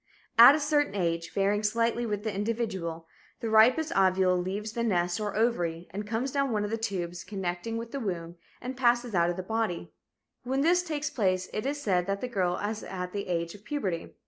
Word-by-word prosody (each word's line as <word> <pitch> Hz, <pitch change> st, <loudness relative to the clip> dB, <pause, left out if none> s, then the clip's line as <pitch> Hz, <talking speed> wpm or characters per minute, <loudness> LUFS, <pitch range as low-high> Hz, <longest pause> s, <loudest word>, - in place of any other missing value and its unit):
At 240 Hz, +5 st, +11 dB
a -, -, 0 dB
certain 290 Hz, -5 st, +1 dB
age, 170 Hz, -3 st, -1 dB
varying 200 Hz, +1 st, +1 dB
slightly 230 Hz, +2 st, 0 dB
with 210 Hz, -1 st, -2 dB
the 220 Hz, -2 st, -2 dB
individual, 195 Hz, -6 st, -3 dB, 0.3 s
the 225 Hz, -, -3 dB
ripest 250 Hz, +9 st, +5 dB
ovule 185 Hz, -1 st, +4 dB
leaves 195 Hz, +4 st, -3 dB
the 235 Hz, -, -3 dB
nest 175 Hz, -5 st, +1 dB
or 210 Hz, -2 st, -3 dB
ovary 175 Hz, -7 st, 0 dB
and 205 Hz, +3 st, -5 dB
comes 230 Hz, +5 st, -1 dB
down 275 Hz, -1 st, +1 dB
one 210 Hz, -3 st, 0 dB
of 210 Hz, -, -3 dB
the 225 Hz, -, 0 dB
tubes 180 Hz, -5 st, -3 dB
connecting 190 Hz, +2 st, -4 dB
with 230 Hz, 0 st, -6 dB
the 280 Hz, -, -3 dB
womb 175 Hz, -6 st, -4 dB, 0.2 s
and 255 Hz, +1 st, -5 dB
passes 240 Hz, -2 st, +2 dB
out 170 Hz, -1 st, +3 dB
of 175 Hz, -, -1 dB
the 185 Hz, -, -3 dB
body. 220 Hz, -3 st, -2 dB, 0.5 s
When 265 Hz, +2 st, 0 dB
this 350 Hz, +4 st, +4 dB
takes 305 Hz, -4 st, -3 dB
place, 185 Hz, -4 st, 0 dB
it 215 Hz, +5 st, -2 dB
is 290 Hz, +1 st, -2 dB
said 180 Hz, -3 st, +1 dB
that 195 Hz, 0 st, -1 dB
the 250 Hz, -, -3 dB
girl 185 Hz, -6 st, 0 dB
is 210 Hz, +1 st, -3 dB
at 180 Hz, -1 st, -5 dB
the 200 Hz, -1 st, -3 dB
age 170 Hz, -1 st, -2 dB
of 205 Hz, -, -14 dB
puberty. 200 Hz, -, -3 dB
210 Hz, 210 wpm, -28 LUFS, 180-235 Hz, 0.5 s, At